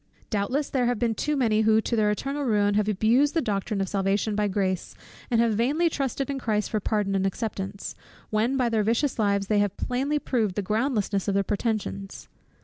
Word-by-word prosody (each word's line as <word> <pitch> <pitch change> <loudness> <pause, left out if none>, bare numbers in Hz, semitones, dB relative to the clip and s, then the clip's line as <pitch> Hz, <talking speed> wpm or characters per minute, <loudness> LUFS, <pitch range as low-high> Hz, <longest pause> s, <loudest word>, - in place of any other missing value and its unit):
Doubtless 250 +8 0
there 250 -3 +1
have 245 -1 +1
been 230 0 +1
too 300 +6 -1
many 220 -4 +2
who, 220 0 +4
to 235 - -1
their 215 -2 +3
eternal 275 +7 -2
ruin, 205 -5 +2
have 210 0 +1
abused 235 - +3
the - - +4
doctrine 200 -3 -2
of 195 - -1
Salvation 200 +2 0
by 210 0 +1
Grace; 190 -2 -2 0.3
and 235 -3 +2
have 230 -1 +3
vainly 290 +10 +1
trusted 275 -1 -2
in 275 -1 -3
Christ 210 -4 -1
for 215 - +1
pardon 205 -1 -1
and 195 -1 +1
acceptance, 195 -1 -4 0.4
when 225 +5 +1
by 250 -2 +2
their 225 -2 +1
vicious 235 +5 0
lives 200 -2 +2
they 210 +1 +2
have 205 -1 0
plainly 270 +4 -1
proved 225 -9 -1
the 205 - -1
groundlessness 215 -2 0
of 200 - +1
their 200 - +3
pretensions. 205 -2 -3
215 Hz, 205 wpm, -26 LUFS, 205-245 Hz, 0.4 s, who